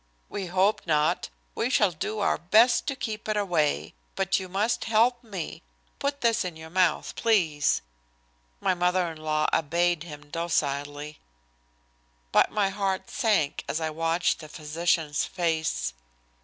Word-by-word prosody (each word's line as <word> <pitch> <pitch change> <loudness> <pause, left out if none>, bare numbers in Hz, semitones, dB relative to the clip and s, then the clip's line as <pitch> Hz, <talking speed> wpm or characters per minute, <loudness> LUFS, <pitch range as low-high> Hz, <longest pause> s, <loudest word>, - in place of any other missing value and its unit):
"We 195 -2 -4
hope 190 +3 +1
not. 155 +2 +1 0.2
We 235 - -1
shall 210 -7 +3
do 210 +6 -3
our - - +1
best 225 +7 +4
to 275 - -1
keep 220 -4 -5
it 215 - +1
away. 170 -7 0 0.2
But 195 0 +1
you 185 -1 -7
must 205 +5 0
help 235 +3 +3
me. 195 -7 -6 0.4
Put 280 0 -2
this 230 -1 +2
in 180 -3 -5
your 160 0 -11
mouth, 180 -1 +1
please." 165 - +2 0.8
My - - +2
mother 180 -1 +1
in 160 - -10
law 155 0 +1
obeyed 170 +2 +2
him 150 -3 -10
docilely. 145 -2 -2 1.1
But - - +5
my 205 -2 +1
heart 195 -1 -2
sank 205 - +1
as 155 - 0
I 160 -1 -2
watched 165 +2 +1
the 155 -2 -10
physician's 155 0 0
face. 160 - -1
175 Hz, 145 wpm, -27 LUFS, 155-205 Hz, 1.1 s, But